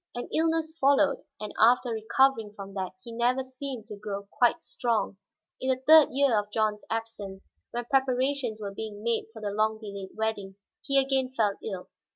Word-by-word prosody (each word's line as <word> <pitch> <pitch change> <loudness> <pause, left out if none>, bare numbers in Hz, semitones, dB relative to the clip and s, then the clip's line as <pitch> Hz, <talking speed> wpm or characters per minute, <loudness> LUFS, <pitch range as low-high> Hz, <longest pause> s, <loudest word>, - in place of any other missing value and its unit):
An 245 - -4
illness 320 0 +1
followed, 280 +1 +4 0.2
and 210 - -5
after 245 +2 +5
recovering 225 0 +2
from 195 -1 -8
that 190 -2 -4
he 235 - -8
never 245 +3 +1
seemed 260 -3 -6
to 215 -1 -8
grow 200 -1 -6
quite 245 -1 +2
strong. 230 -4 -1 0.4
In 260 - -2
the 260 -1 +2
third 310 +1 +8
year 270 -5 +3
of 205 0 -5
John's 215 -1 0
absence, 220 -4 -5 0.2
when 240 0 -4
preparations 260 -2 +1
were 200 -2 -5
being 210 0 -6
made 235 -1 0
for 220 -1 -11
the 205 - -1
long 215 +1 +1
delayed 200 -3 -8
wedding, 210 -3 -2 0.3
he 275 -1 +1
again 265 -1 +2
fell 205 -3 +2
ill. 190 -4 -5
225 Hz, 180 wpm, -28 LUFS, 210-265 Hz, 0.4 s, third